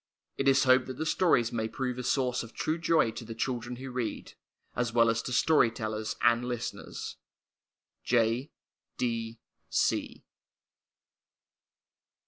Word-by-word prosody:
It 135 Hz, -, -1 dB
is 135 Hz, 0 st, +5 dB
hoped 130 Hz, -1 st, +4 dB
that 130 Hz, -1 st, -6 dB
the 160 Hz, -, -2 dB
stories 155 Hz, -9 st, +3 dB
may 110 Hz, -2 st, -1 dB
prove 125 Hz, +2 st, -3 dB
a -, -, -3 dB
source 125 Hz, -1 st, +1 dB
of 115 Hz, -, -10 dB
true 160 Hz, +2 st, -1 dB
joy 160 Hz, -7 st, +3 dB
to 115 Hz, -, -7 dB
the 115 Hz, 0 st, -8 dB
children 120 Hz, 0 st, -3 dB
who 130 Hz, +1 st, -7 dB
read, 125 Hz, -2 st, -4 dB, 0.4 s
as 120 Hz, -1 st, 0 dB
well 115 Hz, -1 st, +4 dB
as 115 Hz, 0 st, -1 dB
to 125 Hz, -, -6 dB
story 145 Hz, -1 st, +4 dB
tellers 110 Hz, -1 st, -4 dB
and 120 Hz, +1 st, +4 dB
listeners. 120 Hz, -2 st, -5 dB, 0.9 s
J. 120 Hz, +3 st, +1 dB
125 Hz, 130 wpm, -29 LUFS, 115-130 Hz, 0.9 s, is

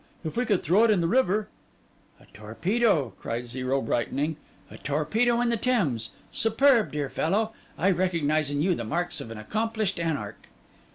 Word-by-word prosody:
If 155 Hz, -, -4 dB
we 245 Hz, +1 st, 0 dB
could 205 Hz, -6 st, +1 dB
throw 190 Hz, +8 st, +4 dB
it 230 Hz, -, +4 dB
in 210 Hz, -4 st, +4 dB
the 170 Hz, -, +1 dB
river—' 215 Hz, -1 st, +2 dB, 0.7 s
'A -, -, -19 dB
torpedo,' 150 Hz, -, 0 dB
cried 120 Hz, +1 st, -4 dB
Zero, 130 Hz, +2 st, -1 dB
brightening, 140 Hz, +7 st, -1 dB, 0.4 s
'a -, -, -11 dB
torpedo 215 Hz, +12 st, +1 dB
in 245 Hz, -, +1 dB
the 235 Hz, -, +1 dB
Thames! 155 Hz, -, 0 dB, 0.2 s
Superb, 230 Hz, +1 st, +3 dB
dear 145 Hz, -1 st, -2 dB
fellow! 215 Hz, +11 st, 0 dB, 0.2 s
I 190 Hz, +4 st, +3 dB
recognise 160 Hz, -5 st, +1 dB
in 145 Hz, +1 st, -1 dB
you 185 Hz, +1 st, +3 dB
the 120 Hz, -, -4 dB
marks 165 Hz, +6 st, -2 dB
of 115 Hz, -, -8 dB
an 115 Hz, -, -7 dB
accomplished 215 Hz, -, -2 dB
anarch. 150 Hz, -12 st, -3 dB
170 Hz, 170 wpm, -26 LUFS, 140-220 Hz, 0.7 s, throw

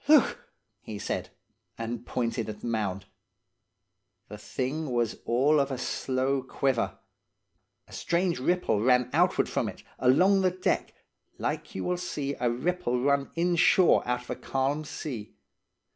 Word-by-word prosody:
"'Look!' 300 Hz, -3 st, +4 dB, 0.3 s
he 110 Hz, -, -7 dB
said, -, -, -3 dB, 0.5 s
and 115 Hz, +1 st, -5 dB
pointed 115 Hz, -2 st, -2 dB
at 105 Hz, -1 st, -7 dB
the -, -, -7 dB
mound. 100 Hz, -4 st, -2 dB, 1.2 s
The 105 Hz, -, -7 dB
thing 135 Hz, +7 st, -3 dB
was 120 Hz, -2 st, 0 dB
all 140 Hz, +6 st, +3 dB
of 140 Hz, 0 st, +1 dB
a 135 Hz, -, -3 dB
slow 130 Hz, +2 st, -1 dB
quiver. 130 Hz, -1 st, -1 dB, 0.9 s
A -, -, -16 dB
strange 170 Hz, -2 st, 0 dB
ripple 175 Hz, -, +1 dB
ran 125 Hz, +1 st, +3 dB
outward -, -, +3 dB
from -, -, -1 dB
it, -, -, -11 dB, 0.2 s
along 180 Hz, +10 st, +5 dB
the 185 Hz, -, +4 dB
deck, 185 Hz, +1 st, -1 dB, 0.4 s
like -, -, -3 dB
you 95 Hz, -, -3 dB
will 180 Hz, -, 0 dB
see 145 Hz, -5 st, -3 dB
a 120 Hz, -, +2 dB
ripple 125 Hz, 0 st, -1 dB
run 140 Hz, +1 st, +1 dB
inshore 175 Hz, +1 st, +4 dB
out 125 Hz, 0 st, -1 dB
of -, -, -19 dB
a -, -, -1 dB
calm 140 Hz, +3 st, -1 dB
sea. 120 Hz, -, -6 dB
130 Hz, 145 wpm, -28 LUFS, 120-160 Hz, 1.2 s, along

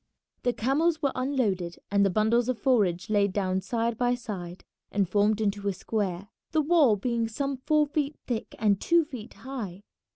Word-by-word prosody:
The 245 Hz, -, +1 dB
camels 305 Hz, +7 st, +1 dB
were 280 Hz, -, +2 dB
unloaded 215 Hz, -10 st, -1 dB
and 200 Hz, 0 st, +4 dB
the 195 Hz, -, +4 dB
bundles 220 Hz, +5 st, +2 dB
of 255 Hz, -, 0 dB
forage 200 Hz, -8 st, +2 dB
laid 205 Hz, -2 st, +2 dB
down 190 Hz, -1 st, 0 dB
side 230 Hz, +3 st, -1 dB
by 245 Hz, 0 st, +2 dB
side 190 Hz, -7 st, -7 dB, 0.3 s
and 200 Hz, -2 st, +1 dB
formed 205 Hz, +3 st, +2 dB
into 205 Hz, -1 st, -1 dB
a 200 Hz, -, +1 dB
square, 195 Hz, -1 st, -3 dB, 0.2 s
the 315 Hz, -, +4 dB
wall 295 Hz, -8 st, +5 dB
being 230 Hz, +2 st, -1 dB
some 275 Hz, +5 st, -2 dB
four 305 Hz, -1 st, +4 dB
feet 295 Hz, 0 st, -2 dB
thick 235 Hz, -3 st, -4 dB
and 205 Hz, -3 st, +2 dB
two 340 Hz, -1 st, +3 dB
feet 250 Hz, -8 st, -9 dB
high. 210 Hz, -5 st, -7 dB
220 Hz, 175 wpm, -27 LUFS, 200-265 Hz, 0.3 s, wall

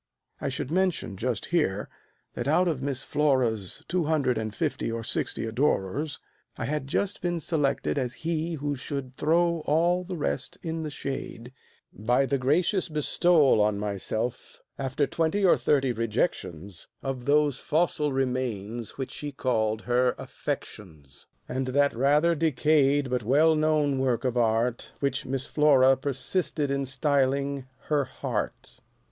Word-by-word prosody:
I -, -, -2 dB
should 130 Hz, -, -4 dB
mention 180 Hz, -, 0 dB
just 115 Hz, +1 st, -2 dB
here, 105 Hz, -, +1 dB, 0.5 s
that 120 Hz, -, -4 dB
out 175 Hz, +5 st, +3 dB
of 155 Hz, -6 st, -1 dB
Miss 135 Hz, -2 st, -2 dB
Flora's 125 Hz, -10 st, 0 dB
Two 180 Hz, -2 st, 0 dB
hundred 145 Hz, -5 st, +1 dB
and 110 Hz, -1 st, -3 dB
fifty 110 Hz, -, -2 dB
or 115 Hz, 0 st, -3 dB
sixty 115 Hz, -, -1 dB
adorers, 130 Hz, +3 st, 0 dB, 0.4 s
I -, -, -3 dB
had 145 Hz, +1 st, -2 dB
just 200 Hz, +7 st, -1 dB
been 175 Hz, -1 st, -1 dB
selected 145 Hz, -3 st, 0 dB
as 125 Hz, -2 st, -2 dB
he 165 Hz, 0 st, -1 dB
who 145 Hz, -1 st, -2 dB
should 135 Hz, -1 st, -5 dB
throw 170 Hz, +3 st, +2 dB
all 170 Hz, +4 st, +2 dB
The 180 Hz, 0 st, -5 dB
rest 140 Hz, -3 st, -2 dB
in 165 Hz, -1 st, -3 dB
the 155 Hz, -, -3 dB
shade, 135 Hz, -3 st, -6 dB, 0.4 s
by 120 Hz, +6 st, +2 dB
the 140 Hz, 0 st, 0 dB
gracious 170 Hz, +8 st, +1 dB
bestowal 150 Hz, -3 st, +3 dB
On 105 Hz, -1 st, +2 dB
myself, 105 Hz, +4 st, -3 dB, 0.2 s
after 135 Hz, +1 st, 0 dB
twenty 165 Hz, +7 st, 0 dB
or 180 Hz, -, +6 dB
thirty 135 Hz, -3 st, +2 dB
rejections, 100 Hz, -, -2 dB, 0.2 s
Of 130 Hz, -2 st, -4 dB
those 145 Hz, -1 st, +3 dB
fossil 155 Hz, -2 st, +1 dB
remains 120 Hz, -4 st, -2 dB
which 135 Hz, -1 st, -4 dB
she 145 Hz, -1 st, -5 dB
called 110 Hz, -5 st, 0 dB
her 125 Hz, 0 st, +2 dB
"affections," 80 Hz, -9 st, -7 dB, 0.2 s
And 130 Hz, 0 st, -2 dB
that 140 Hz, +1 st, +2 dB
rather 145 Hz, +7 st, +3 dB
decayed 145 Hz, -3 st, +2 dB
but 125 Hz, -1 st, +1 dB
well 145 Hz, +8 st, +4 dB
known 155 Hz, -3 st, +2 dB
work 125 Hz, -2 st, 0 dB
of 125 Hz, -1 st, 0 dB
art 115 Hz, +1 st, 0 dB
Which 140 Hz, -1 st, -1 dB
Miss 130 Hz, 0 st, -2 dB
Flora 135 Hz, -3 st, +5 dB
persisted 140 Hz, +2 st, -2 dB
in 140 Hz, 0 st, 0 dB
styling 140 Hz, 0 st, 0 dB
her 145 Hz, -3 st, 0 dB
"heart." -, -, -5 dB
135 Hz, 145 wpm, -27 LUFS, 125-150 Hz, 0.5 s, or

